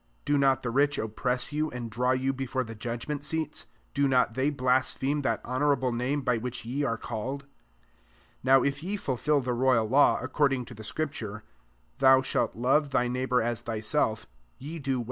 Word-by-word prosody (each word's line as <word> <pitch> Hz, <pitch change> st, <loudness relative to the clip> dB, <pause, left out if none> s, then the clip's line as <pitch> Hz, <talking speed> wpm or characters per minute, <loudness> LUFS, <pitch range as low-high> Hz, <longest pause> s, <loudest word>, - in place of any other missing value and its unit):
Do 145 Hz, -, +2 dB
not 135 Hz, -2 st, +3 dB
the 125 Hz, -, -2 dB
rich 145 Hz, +3 st, +2 dB
oppress 125 Hz, +4 st, -1 dB
you, 155 Hz, +1 st, 0 dB
and 120 Hz, -3 st, -6 dB
draw 125 Hz, +3 st, 0 dB
you 130 Hz, +1 st, +1 dB
before 130 Hz, 0 st, -2 dB
the 115 Hz, -2 st, -8 dB
judg 115 Hz, +2 st, -5 dB
ment 150 Hz, -1 st, -3 dB
seats? 160 Hz, 0 st, -2 dB
7 -, -, -33 dB, 0.2 s
Do 140 Hz, +1 st, +2 dB
not 125 Hz, -3 st, +2 dB
they 130 Hz, +4 st, +1 dB
blas 130 Hz, -2 st, +1 dB
pheme 145 Hz, +2 st, -1 dB
that 140 Hz, -, -1 dB
honourable 130 Hz, 0 st, +1 dB
name 125 Hz, +5 st, -1 dB
by 125 Hz, -1 st, +2 dB
which 125 Hz, 0 st, -5 dB
ye 130 Hz, +5 st, -2 dB
are 115 Hz, -4 st, 0 dB
called 125 Hz, +6 st, -4 dB
I -, -, -25 dB
8 -, -, -31 dB, 1.0 s
Now 130 Hz, 0 st, +6 dB
if 140 Hz, +1 st, -1 dB
ye 195 Hz, +5 st, -2 dB
fulfil 145 Hz, -, 0 dB
the 125 Hz, -1 st, -2 dB
rcfyal 125 Hz, -2 st, +2 dB
law 145 Hz, +2 st, +5 dB
according 135 Hz, -4 st, 0 dB
to -, -, -11 dB
the 110 Hz, -, -10 dB
scriptare, 110 Hz, -5 st, -3 dB, 0.3 s
" -, -, -38 dB
Thou 130 Hz, 0 st, +6 dB
shalt -, -, 0 dB
love 135 Hz, +5 st, +2 dB
thy 125 Hz, -2 st, +1 dB
neigh 125 Hz, +1 st, -1 dB
bour 125 Hz, -3 st, +2 dB
as 120 Hz, 0 st, -2 dB
thyself," 110 Hz, 0 st, -1 dB, 0.3 s
ye 155 Hz, +5 st, -7 dB
do 135 Hz, -2 st, -1 dB
wd! -, -, -2 dB
130 Hz, 210 wpm, -28 LUFS, 120-140 Hz, 1.0 s, Now